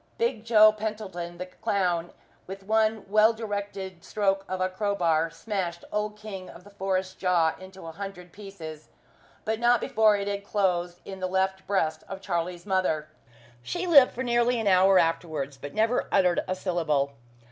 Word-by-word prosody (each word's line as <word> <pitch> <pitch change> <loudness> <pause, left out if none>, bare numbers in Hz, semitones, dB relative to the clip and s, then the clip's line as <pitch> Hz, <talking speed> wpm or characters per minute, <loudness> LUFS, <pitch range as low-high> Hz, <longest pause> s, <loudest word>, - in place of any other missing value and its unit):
Big 230 -1 0
Joe 215 -2 +7
Pentland, 210 -5 -5
the 180 - -3
clown, 180 -2 -1 0.4
with 195 +1 -8
one 220 +1 +1
well 215 +3 +5
directed 200 -5 -5
stroke 195 -2 0
of 185 - -3
a 185 - +2
crowbar, 180 -5 0
smashed 175 -1 -4
Old 210 0 -2
King 195 -3 -8
of 175 - -13
the 205 - -15
Forest's 190 -1 -2
jaw 175 -4 +2
into 190 -1 -12
a 165 - -6
hundred 180 0 -8
pieces, 170 -7 -10 0.6
but 220 0 -1
not 240 0 +4
before 215 -1 +3
it 200 0 -3
had 200 0 -3
closed 180 -4 -1
in 190 -1 -8
the 185 - -1
left 190 +1 -1
breast 160 -6 0
of 195 - -6
Charlie's 175 -2 -3
mother. 185 -6 0 0.5
She 355 - -3
lived 285 -7 +7
for 255 - -3
nearly 240 0 +2
an 225 - -2
hour 190 0 +5
afterwards, 160 -5 0
but 145 +2 -9
never 225 +3 +1
uttered 180 -3 +3
a 185 - -1
syllable. 160 -7 0
190 Hz, 170 wpm, -27 LUFS, 175-210 Hz, 0.6 s, Joe